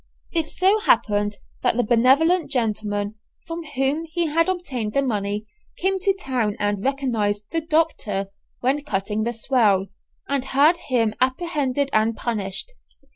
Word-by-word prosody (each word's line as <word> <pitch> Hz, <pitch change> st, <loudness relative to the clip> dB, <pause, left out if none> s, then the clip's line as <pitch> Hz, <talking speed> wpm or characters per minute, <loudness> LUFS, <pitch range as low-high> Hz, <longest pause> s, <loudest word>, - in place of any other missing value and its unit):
It 325 Hz, -2 st, -1 dB
so 390 Hz, +4 st, +3 dB
happened 205 Hz, -, +2 dB, 0.2 s
that -, -, +1 dB
the 245 Hz, -, +3 dB
benevolent 270 Hz, +10 st, +3 dB
gentleman 215 Hz, -4 st, -1 dB, 0.3 s
from 335 Hz, 0 st, -5 dB
whom 270 Hz, +5 st, +1 dB
he 335 Hz, +1 st, -1 dB
had 330 Hz, +3 st, +2 dB
obtained 260 Hz, -13 st, -3 dB
the 275 Hz, -, +3 dB
money 210 Hz, -3 st, -2 dB, 0.3 s
came 385 Hz, +1 st, +1 dB
to 390 Hz, +1 st, +2 dB
town 250 Hz, -, -1 dB
and 205 Hz, -1 st, -1 dB
recognized 230 Hz, -7 st, 0 dB
the 330 Hz, -, 0 dB
"Doctor," 305 Hz, -12 st, 0 dB, 0.3 s
when 275 Hz, +4 st, +1 dB
cutting 210 Hz, -3 st, -2 dB
the 235 Hz, -, 0 dB
swell, 215 Hz, -5 st, +2 dB, 0.4 s
and 280 Hz, -2 st, 0 dB
had 285 Hz, +6 st, +4 dB
him 230 Hz, -4 st, +2 dB
apprehended 275 Hz, 0 st, 0 dB
and 220 Hz, +1 st, +2 dB
punished. 210 Hz, -, -2 dB
255 Hz, 140 wpm, -23 LUFS, 210-320 Hz, 0.4 s, had